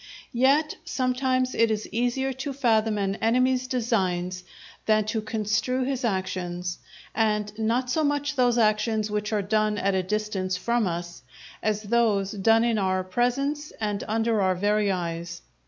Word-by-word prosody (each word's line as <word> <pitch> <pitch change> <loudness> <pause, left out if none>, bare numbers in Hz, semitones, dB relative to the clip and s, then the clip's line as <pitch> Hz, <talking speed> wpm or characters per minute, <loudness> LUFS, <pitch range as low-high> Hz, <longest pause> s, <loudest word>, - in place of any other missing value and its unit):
Yet 275 +5 +3
sometimes 255 -4 0
it 230 0 +3
is 215 -1 -2
easier 245 +3 0
to 270 +2 -5
fathom 225 -5 +2
an 195 0 -1
enemy's 255 +2 +2
designs 185 -8 -1 0.4
than 215 -1 +3
to 220 +1 -1
construe 220 +4 -1
his 265 0 -2
actions; 180 -4 -2 0.3
and 210 -2 0
not 240 +3 0
so 315 - +1
much 290 0 0
those 245 -2 +3
actions 215 -1 +1
which 210 0 -2
are 210 -2 0
done 215 +1 +1
at 200 0 +1
a 190 - +2
distance 190 -1 -2
from 235 +2 0
us, 175 0 -5 0.4
as 215 0 -1
those 210 -3 +1
done 225 +2 +3
in 230 -2 +1
our 185 -1 0
presence 275 +9 -1
and 210 -2 -2
under 225 0 +1
our 185 -1 +2
very 205 +2 +1
eyes. 170 -1 -4
215 Hz, 155 wpm, -26 LUFS, 200-250 Hz, 0.4 s, Yet